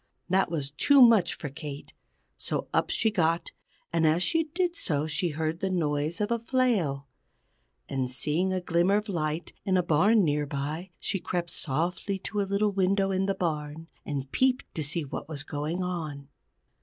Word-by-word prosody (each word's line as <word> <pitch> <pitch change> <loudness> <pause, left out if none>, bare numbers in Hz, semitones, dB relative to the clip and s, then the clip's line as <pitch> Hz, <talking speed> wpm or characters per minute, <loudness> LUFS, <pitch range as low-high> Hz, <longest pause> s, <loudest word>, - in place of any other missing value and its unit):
That 190 0 +3
was 145 -4 -3
too 280 - +4
much 225 -8 +6
for 150 - -6
Kate. 140 +1 -8 0.4
So - - -3
up - - +2
she 220 - +1
got, 170 -4 +1 0.4
and 165 -1 +3
as 165 +3 +3
she 325 - +2
did 345 +2 -1
so 150 - 0
she 160 +3 -1
heard 160 +2 -2
the 190 - -1
noise 155 -2 0
of 210 +2 -1
a 235 - +1
flail. 220 - +1 0.8
And 130 -2 -2
seeing 155 +9 0
a 185 -1 -1
glimmer 175 +3 +2
of 210 +1 -1
light 160 -2 -2
in 190 -1 +2
a 180 - +2
barn 200 +7 +4
near 150 -2 +1
by, 150 +6 -4
she 195 - -2
crept 175 -1 -3
softly 175 +7 -1
to 205 +2 -3
a 195 - -2
little 205 +1 +2
window 195 0 +2
in 190 0 +1
the 195 - +1
barn, 155 -1 -3
and 140 -2 -4
peeped 260 0 +2
to 160 - -3
find 150 0 -2
what - - -5
was 145 -4 -4
going 155 +5 -3
on. 155 -6 -4
170 Hz, 180 wpm, -28 LUFS, 150-195 Hz, 0.8 s, much